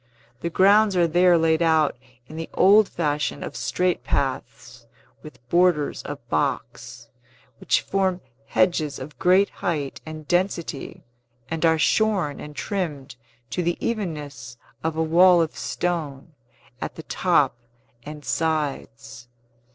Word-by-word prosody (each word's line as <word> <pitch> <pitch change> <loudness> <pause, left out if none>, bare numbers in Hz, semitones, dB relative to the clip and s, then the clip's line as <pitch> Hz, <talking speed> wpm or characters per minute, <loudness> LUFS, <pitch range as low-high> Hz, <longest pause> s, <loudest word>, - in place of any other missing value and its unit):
The 170 - -3
grounds 200 +3 +4
are 175 -1 +4
there 175 +1 +4
laid 160 0 +2
out 160 -4 +3 0.3
in 155 - -12
the 165 0 -6
old 205 +2 +5
fashion 150 -3 -2
of - - -7
straight 180 -1 -1
paths, 125 -2 -4 0.3
with 125 -5 -14
borders 175 -3 +2
of - - -8
box, - - -3 0.5
which - - +1
form 190 -2 0 0.3
hedges 155 -4 +1
of 135 0 -10
great 185 +3 +4
height 150 -5 -2
and 155 -1 -9
density, 175 -5 -2 0.5
and 165 0 -2
are 160 0 +3
shorn 190 -3 +1
and 150 0 -9
trimmed 160 - -4 0.4
to 180 - -1
the 175 0 -1
evenness 145 - -4 0.3
of 160 0 -1
a 160 - +2
wall 175 +2 +5
of 160 -2 -1
stone, 160 -4 -4 0.5
at - - -5
the 160 - -9
top 150 -10 +1 0.5
and 150 +3 -10
sides. 140 -6 -3
160 Hz, 130 wpm, -23 LUFS, 145-180 Hz, 0.5 s, old